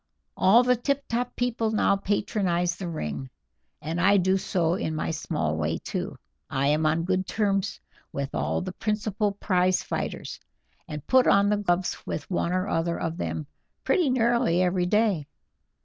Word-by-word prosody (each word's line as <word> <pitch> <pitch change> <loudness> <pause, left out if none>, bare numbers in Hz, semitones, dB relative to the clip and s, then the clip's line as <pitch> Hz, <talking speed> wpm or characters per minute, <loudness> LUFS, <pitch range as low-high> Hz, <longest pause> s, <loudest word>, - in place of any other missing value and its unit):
All 225 +6 +6
the 250 0 +3
tip 280 +3 -1
top 245 +2 -2
people 240 -2 0
now 215 -2 +3
patronize 190 -3 0
the 180 0 -5
ring, 75 - -4 0.5
and 165 +3 -2
I 200 +2 +5
do 190 0 +3
so 175 -3 0
in 160 -4 -2
my 155 - -2
small 150 - -2
way 80 +1 -1
too. - - -5 0.3
I 135 +1 +1
am 155 +1 +2
on 160 +2 +1
good 185 +1 0
terms 195 -3 0 0.3
with 140 0 -4
all - - -1
the 185 0 -4
principal 210 -1 -1
prize 185 -2 +1
fighters, - - -4 0.5
and 150 -3 -7
put 260 -1 +4
on 200 0 +5
the 210 - +2
gloves 185 -3 -1
with 145 - -5
one 175 -1 0
or 185 +2 0
other 170 -1 -1
of 165 0 -3
them 155 - -3 0.4
pretty 355 - +2
nearly 235 -7 +2
every 180 0 +1
day. 205 -7 +2
185 Hz, 165 wpm, -26 LUFS, 165-210 Hz, 0.5 s, All